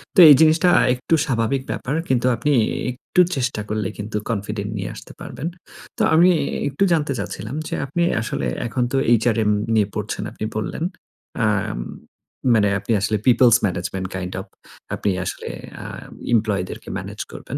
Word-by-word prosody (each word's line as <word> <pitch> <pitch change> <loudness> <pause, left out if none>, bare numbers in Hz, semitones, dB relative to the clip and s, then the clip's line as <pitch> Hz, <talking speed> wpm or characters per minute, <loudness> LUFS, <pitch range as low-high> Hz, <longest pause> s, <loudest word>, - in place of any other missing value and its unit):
তো - - +5
এই 145 - +10
জিনিসটা 160 +3 +5 0.2
একটু 125 +6 -2
স্বাভাবিক 130 0 0
ব্যাপার। 135 - -3 0.2
কিন্তু 125 -1 +2
আপনি 145 +6 0 0.4
একটু 135 +8 +1
চেষ্টা 125 -4 -1
করলে 105 -2 -1
কিন্তু 105 +1 -4
কনফিডেন্ট 105 -1 -3
নিয়ে 95 - -3
আসতে - - -11
পারবেন। 155 - -6 0.5
তো - - -2
আমি 175 +3 +6 0.4
একটু 140 +8 0
জানতে 150 -3 +1
চাচ্ছিলাম 110 +6 -5
যে - - -6
আপনি 160 +6 -2 0.2
আসলে 70 - -3 0.2
এখন 125 +1 -1
তো 135 - +1 0.2
HRM 110 -3 +2 0.2
নিয়ে 105 -3 +3
পড়ছেন, 105 -1 -3
আপনি 110 - -5
বললেন। 110 +8 -3 0.6
আ - - +4 1.1
মানে 105 -2 +4
আপনি 100 +4 -5
আসলে 110 +1 +1
পিওপলস 120 -1 +6
ম্যানেজমেন্ট 95 0 -2
কাইন্ড 90 0 -4
ওএফ - - -8 0.5
আপনি 105 - -1 0.2
আসলে - - -5 0.3
আ - - -10 0.5
এমপ্লয়ি 105 -3 +1
দেরকে - - -8
মেনেজ - - -8
করবেন। - - -6
115 Hz, 155 wpm, -21 LUFS, 105-135 Hz, 1.1 s, এই